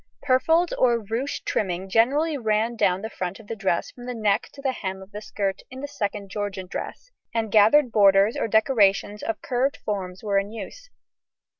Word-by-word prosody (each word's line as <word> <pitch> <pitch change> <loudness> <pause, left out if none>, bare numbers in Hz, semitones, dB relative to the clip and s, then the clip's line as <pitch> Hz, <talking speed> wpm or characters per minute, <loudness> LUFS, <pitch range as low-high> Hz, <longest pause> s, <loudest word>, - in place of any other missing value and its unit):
Purfled 320 +6 +3
or 240 -2 +4
ruched 230 +5 -4
trimming 185 -1 -1
generally 280 - +2
ran 220 -2 0
down 190 -3 +1
the 220 - -3
front 185 +2 -4
of 225 - -14
the 225 - -5
dress 195 -5 -1
from 245 0 -11
the 250 - -4
neck 210 -3 +1
to - - -14
the 275 -1 0
hem 190 -6 -5
of 190 +1 -13
the 210 +1 -7
skirt 195 -2 -3
in 260 +1 -9
the 285 - -4
Second 205 -6 -4
Georgian 205 -2 -4
dress, - - -7 0.2
and 225 -2 -1
gathered 225 +6 +5
borders 200 +2 +5
or 285 - -1
decorations 210 -2 +2
of 225 - -4
curved 260 +2 0
forms 190 -2 -4
were 200 -2 +2
in 195 +1 -4
use. 230 - -9
215 Hz, 190 wpm, -24 LUFS, 195-250 Hz, 0.2 s, gathered